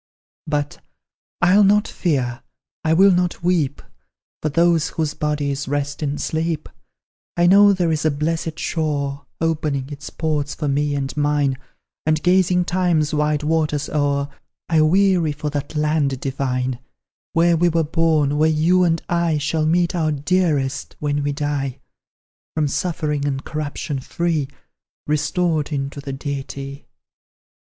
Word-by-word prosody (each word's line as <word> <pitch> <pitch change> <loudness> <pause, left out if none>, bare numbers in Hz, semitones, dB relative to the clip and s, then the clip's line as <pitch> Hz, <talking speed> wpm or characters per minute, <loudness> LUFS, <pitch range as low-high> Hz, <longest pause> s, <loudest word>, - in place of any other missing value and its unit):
"But, 145 -1 -2 0.6
I'll 190 +3 +6
not 205 +2 +4
fear, 130 -7 -1 0.4
I 160 - +1
will 190 +4 +6
not 180 -1 0
weep 165 -6 0 0.6
For 155 - 0
those 165 +1 +3
whose 155 -3 -2
bodies 145 -2 -2
rest 145 +1 -2
in 145 -1 -1
sleep, 160 0 -2 0.7
I 175 - +4
know 200 +3 +7
there 180 -4 +1
is 155 -1 -1
a 155 - +3
blessed 160 +2 -2
shore, 145 -4 -2
Opening 150 -4 -1
its 145 +1 -7
ports 150 -3 -2
for 150 - -3
me 145 +1 0
and 135 -1 -3
mine; 145 -2 +1 0.5
And, 155 0 +2
gazing 180 0 +3
Time's 175 -5 +1
wide 150 0 +1
waters 150 -2 0
o'er, 140 -1 0 0.4
I 160 -2 +3
weary 175 -1 +3
for 150 0 -4
that 145 +1 -4
land 150 -3 +1
divine, 130 -2 -2 0.5
Where 170 +1 +4
we 175 +2 +3
were 165 0 +1
born, 155 -2 +1
where 155 +1 +4
you 165 +4 +3
and 165 -2 +1
I 170 -2 +1
Shall 155 +2 0
meet 175 +1 +2
our 160 -3 +1
dearest, 145 -3 0
when 145 -1 -1
we 145 0 0
die; 140 -2 -2 0.8
From 155 -2 +1
suffering 150 -2 -1
and 135 -1 -3
corruption 150 -2 -4
free, 165 0 -1 0.6
Restored 155 +1 0
into 140 0 -3
the 140 - -6
Deity." 140 0 -6
150 Hz, 140 wpm, -21 LUFS, 145-165 Hz, 0.8 s, know